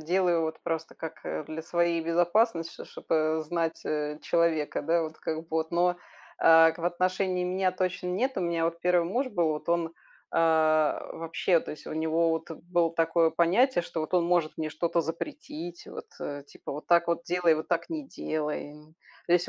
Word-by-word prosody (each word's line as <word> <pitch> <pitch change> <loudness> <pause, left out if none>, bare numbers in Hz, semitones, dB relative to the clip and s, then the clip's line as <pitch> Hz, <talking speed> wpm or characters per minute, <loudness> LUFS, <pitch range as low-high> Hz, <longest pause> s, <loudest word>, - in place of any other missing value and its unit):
делаю 175 +1 +2
вот 160 0 -3
просто 160 -1 -3
как, 160 0 -8
а, - - -3
для 155 +2 -6
своей 170 0 +1
безопасности, 170 +2 +2
чтоб - - -10
чтоб, - - -12
э, 155 0 +2
знать, 165 +1 -2
э, 150 0 -2
человека, 165 -3 +1
да 170 0 +2
вот 155 -1 -6
как 160 -1 -3
бы 165 - -15
вот. 160 0 -1
Но, 175 +1 +2 0.4
э, 165 0 +7
к - - -15
в 170 - -5
отношении 185 +1 0
меня 185 +1 0
точно 185 0 -2
нет. 230 +9 0
У - - 0
меня 170 -2 0
вот 170 0 -1
1 180 -1 +3
муж 255 +7 0
был, 175 -8 +1
вот 150 - -6
он, 170 -1 0 0.4
а, 155 -2 +3
вообще. 165 +1 +1
То - - -8
есть 150 - -10
у - - -5
него 160 +1 +1
вот 160 0 -3
было 170 +1 0
такое 165 0 +3
понятие, 180 +9 +3
что 165 - -4
вот 155 - -4
он 180 -2 +3
может 170 -3 +2
мне 155 -1 -1
что-то 170 +2 0
запретить, 300 - -6
вот, 460 0 -9
э, 145 0 -5
типа, - - -9
вот 150 +2 -7
так 170 0 +4
вот 170 0 0
делай, 175 -2 +3
вот 155 0 -5
так 170 -2 0
не 310 -4 -4
делай. 150 - -4 0.5
То 170 - +1
есть 175 0 +3
170 Hz, 200 wpm, -28 LUFS, 160-180 Hz, 0.5 s, э